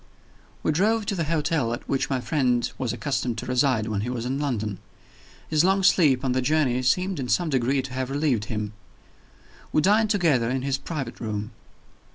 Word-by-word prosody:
We - - +2
drove 210 +7 +2
to 200 - -1
the 170 -3 -1
hotel 150 -6 0
at 120 - -7
which 135 - 0
my 135 -2 0
friend 125 -3 +1
was 130 -4 -1
accustomed 125 -4 -2
to - - -5
reside 125 -3 +1
when 105 -3 -1
he 115 - -3
was 120 -2 -3
in 135 +2 -2
London. 110 -8 -2 0.7
His 155 0 +2
long 190 +1 +3
sleep 140 -8 +4
on 130 - +1
the 130 +1 +1
journey 130 -3 +1
seemed, 180 +7 +1
in 125 -2 -4
some 175 +4 +1
degree, 130 +1 +1
to 130 - -8
have 130 0 -2
relieved 135 -6 0
him. 105 -2 -4 1.0
We 155 - +2
dined 215 +3 +4
together 160 - +2
in 130 0 -1
his 135 -1 -1
private 140 -7 -5
room. 105 -1 -4
130 Hz, 195 wpm, -25 LUFS, 120-155 Hz, 1.0 s, sleep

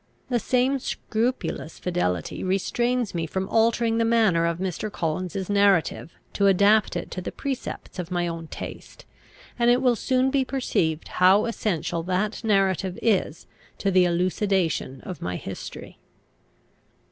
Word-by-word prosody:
The 245 -2 +1
same 255 +4 +1
scrupulous 230 -8 -3
fidelity 90 - -2
restrains 235 +5 0
me 165 -2 -2
from 190 +4 -3
altering 230 0 +2
the - - +3
manner 220 -8 +3
of 170 -1 -1
Mr. 190 +3 -3
Collins's 185 +3 -3
narrative 200 -5 +2 0.2
to 200 - +2
adapt 200 +1 +4
it 175 - -4
to 185 - -4
the - - -5
precepts 265 -7 -5
of 175 -1 -4
my 175 -1 0
own 165 -1 -5
taste; - - -9 0.5
and 235 0 +4
it 245 +1 +5
will 250 -2 +3
soon 255 +4 +1
be 275 -1 +2
perceived 170 - -1
how 190 +3 +4
essential 175 -7 -2
that 185 +6 -2
narrative 195 -3 +1
is 190 -7 0 0.3
to 200 - 0
the 185 -1 +5
elucidation 175 -5 0
of 180 -5 -8
my 90 0 -3
history. - - -8
195 Hz, 145 wpm, -25 LUFS, 175-230 Hz, 0.5 s, it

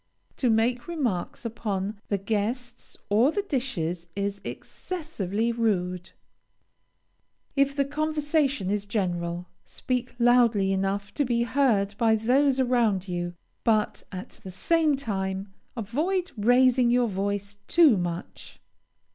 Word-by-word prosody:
To 250 - +2
make 235 +2 +1
remarks 250 - -2
upon 210 -3 -3
the 200 - 0
guests 225 +5 -3
or 225 +8 +4
the 405 +3 -1
dishes 180 - -2
is 200 0 -2
excessively 235 - -3
rude. 185 -6 -1 1.5
If 275 0 +2
the 280 -1 +2
conversation 295 - 0
is 205 -1 -1
general, 175 -4 -2 0.2
speak 250 -1 -3
loudly 235 -5 +4
enough 195 +1 -1
to 290 - +1
be 240 -2 +1
heard 235 -6 +2
by 225 -1 +4
those 260 +5 +2
around 235 -7 +2
you, 175 -1 -3 0.3
but, 215 -2 +1
at 185 -1 -8
the 190 - -7
same 310 - +2
time, 195 -5 -3 0.2
avoid 325 - -1
raising 245 +2 +4
your 245 0 +3
voice 200 0 -3
too 320 -9 +6
much. 175 -1 -5
225 Hz, 120 wpm, -26 LUFS, 195-260 Hz, 1.5 s, too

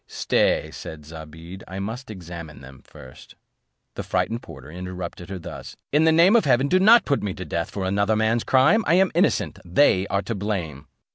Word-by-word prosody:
"Stay," - - 0
said 75 -2 -9
Zobeide, 80 +3 -11
"I 95 - -8
must 115 +6 -6
examine 85 - -9
them 65 -1 -14
first." 65 0 -15 0.6
The - - -5
frightened 115 +1 -2
porter 65 +3 -12
interrupted 90 0 -7
her 95 - -5
thus: 85 - -9
"In 150 +3 +3
the 160 - +5
name 170 +7 +5
of 225 -7 +4
heaven, 130 0 +3
do 185 +6 +3
not 225 +5 +6
put 140 - 0
me 100 -3 -4
to 95 - -7
death 85 - -3
for 95 -2 -4
another 100 +3 +1
man's 110 +2 +1
crime. 150 +13 +3
I 165 - +4
am 190 0 +3
innocent; - - 0
they 95 0 +2
are 100 0 -1
to 115 - -4
blame." 90 -9 -4
100 Hz, 195 wpm, -23 LUFS, 85-130 Hz, 0.6 s, not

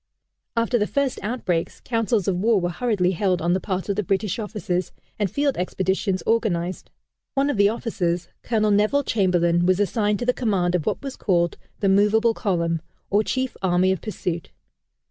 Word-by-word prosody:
After 230 +1 +2
the 210 - +1
first 280 -2 0
outbreaks, 195 -7 -2
councils 225 -4 0
of 195 - +2
war 210 +3 +3
were 175 -1 -1
hurriedly 185 -2 +1
held 185 0 +1
on 170 +2 +1
the 185 - +1
part 185 -1 -3
of 200 - 0
the 210 - +1
British 195 +2 -1
officers, 210 -4 -2 0.3
and 205 -2 +1
field 285 +5 0
expeditions 190 +1 -1
organized. 185 -6 0 0.5
One 280 +1 +2
of 260 - -3
the 200 0 +5
officers, 180 -6 -2
Colonel 215 -2 +1
Neville 215 +8 +3
Chamberlain, 175 -6 +2
was 185 +1 +3
assigned 205 0 +1
to 240 - -3
the 250 - +3
command 195 -8 0
of 175 -4 -1
what - - -1
was 275 -1 -5
called 170 -3 +1 0.3
the 200 - +2
"Movable 210 +4 +4
Column," 170 -7 -1 0.3
or 205 +2 +3
chief 260 +2 -2
army 185 0 +3
of 190 - -2
pursuit. 175 -6 -4
200 Hz, 180 wpm, -23 LUFS, 180-225 Hz, 0.5 s, the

